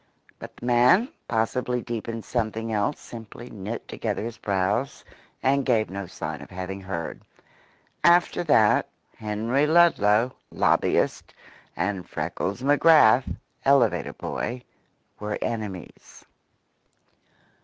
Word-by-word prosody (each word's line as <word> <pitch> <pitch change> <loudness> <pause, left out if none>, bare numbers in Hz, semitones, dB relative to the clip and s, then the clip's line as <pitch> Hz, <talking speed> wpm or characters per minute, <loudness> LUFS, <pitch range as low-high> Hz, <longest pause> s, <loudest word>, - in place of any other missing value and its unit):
But - - -10
the - - -9
man, 125 - +4 0.2
possibly 125 +2 0
deep 115 -2 -5
in 115 -1 -5
something 115 -1 -2
else, 105 -1 0
simply 120 +1 -10
knit 105 +2 -6
together - - -3
his 115 -1 -6
brows 100 +6 -1 0.4
and 140 +1 +2
gave 115 -6 +1
no 100 -1 -5
sign - - -6
of - - -11
having 95 +1 -6
heard. 85 -3 -5 0.8
After 175 0 +4
that, 115 -9 +4 0.3
Henry 115 +7 0
Ludlow, 130 -8 +4 0.2
lobbyist, - - +1 0.4
and 95 0 -2
Freckles 100 +6 -3
McGrath, 145 -4 +5 0.3
elevator 125 -10 +3
boy, 125 +1 -4 0.6
were 105 0 -3
enemies. 105 -6 -6
115 Hz, 110 wpm, -25 LUFS, 105-125 Hz, 0.8 s, McGrath